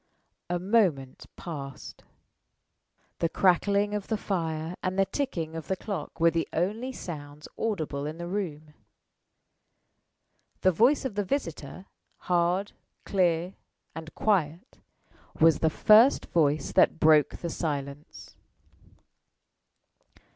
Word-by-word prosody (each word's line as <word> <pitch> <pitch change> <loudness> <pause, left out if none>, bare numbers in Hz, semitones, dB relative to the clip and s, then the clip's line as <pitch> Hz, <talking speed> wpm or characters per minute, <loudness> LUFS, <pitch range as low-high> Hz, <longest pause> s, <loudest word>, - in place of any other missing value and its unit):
A 175 - 0
moment 180 - 0
passed. 140 -6 -8 1.2
The 165 - +1
crackling 200 +4 +2
of 205 -2 -3
the 220 - -1
fire 165 -4 -3
and 185 +1 -2
the 195 - +4
ticking 170 - -3
of 160 - -6
the 190 - 0
clock 200 -2 -6
were 165 0 +5
the 165 0 -1
only 215 +10 -1
sounds 150 - -8
audible 155 -10 -3
in 155 +2 -6
the 170 - -6
room. 160 -6 -5 1.9
The 185 - +4
voice 245 - +3
of 260 - -2
the 205 +1 -1
visitor 185 - -4 0.3
hard, 180 +3 0 0.3
clear, 180 -1 +1 0.4
and 160 0 -8
quiet 180 - -1 0.6
was 160 -1 +5
the 160 - +2
first 220 - +5
voice 150 -3 +1
that - - +3
broke 155 -2 +4
the 170 - -5
silence. 145 -2 -5
170 Hz, 115 wpm, -27 LUFS, 155-200 Hz, 1.9 s, were